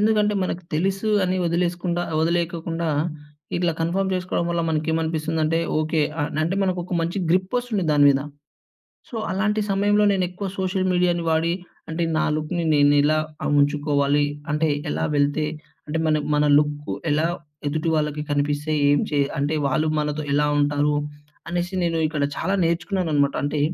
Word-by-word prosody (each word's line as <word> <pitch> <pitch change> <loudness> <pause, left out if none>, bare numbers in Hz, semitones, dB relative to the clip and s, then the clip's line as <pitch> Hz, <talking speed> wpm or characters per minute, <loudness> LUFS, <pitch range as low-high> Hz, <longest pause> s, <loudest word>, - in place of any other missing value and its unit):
ఎందుకంటే 210 -1 +3
మనకు 180 -1 -3
తెలుసు 195 +6 0
అని 185 +1 0
వదిలేసుకుండా 175 +1 0 0.2
వదిలేయ్యకుండా 170 0 -1 0.7
ఇట్లా 175 -1 +1
కన్ఫర్మ్ 190 +4 0
చేసుకోవడం 180 -1 -1
వల్ల 170 -1 0
మనకేమనిపిస్తుందంటే, 160 0 0 0.2
ఓకే, 155 0 0 0.2
ఆహ్ 145 - -1
అంటే 170 +4 0
మనకొక 180 -1 -1
మంచి 170 +4 -2
గ్రిపొస్తుంది 200 +3 0
దాని 145 -1 +5
మీద. 135 -1 +3 0.9
సో, - - -8 0.2
అలాంటి 210 +2 0
సమయంలో 205 +1 +3
నేనెక్కువ 185 +1 -2
సోషల్ 185 0 0
మీడియా‌ని 175 -1 +1
వాడి, 160 +1 +2 0.4
అంటే 165 +1 -1
నా - - +2
లుక్‌ని 155 +3 -2
నేనిలా 145 +1 +4 0.3
ఆ! - - -2
ఉంచుకోవాలి. 145 0 +2 0.3
అంటే 150 +1 +1 0.2
ఎలా - - -1
వెళ్తే 145 +2 +1 0.4
అంటే 160 +2 -2
మన 155 -1 +3 0.2
మన 150 0 +3
లుక్కు 150 0 -1 0.2
ఎలా 155 +2 +2 0.4
ఎదుటి 155 +3 -1
వాళ్ళకి 150 -1 -1
కనిపిస్తే, 145 +1 0 0.2
ఏం 145 0 +4
చే 145 -2 0 0.2
అంటే 145 +2 0
వాళ్ళు 155 +3 +1
మనతో 150 0 -2
ఎలా 150 +1 +3
ఉంటారు 145 0 +2 0.5
అనేసి 175 +2 -2
నేను 165 -1 0
ఇక్కడ 150 -2 -2
చాలా 190 +4 0
నేర్చుకున్నాననమాట. 170 -4 0
అంటే 145 +1 -1
165 Hz, 140 wpm, -23 LUFS, 150-180 Hz, 0.9 s, దాని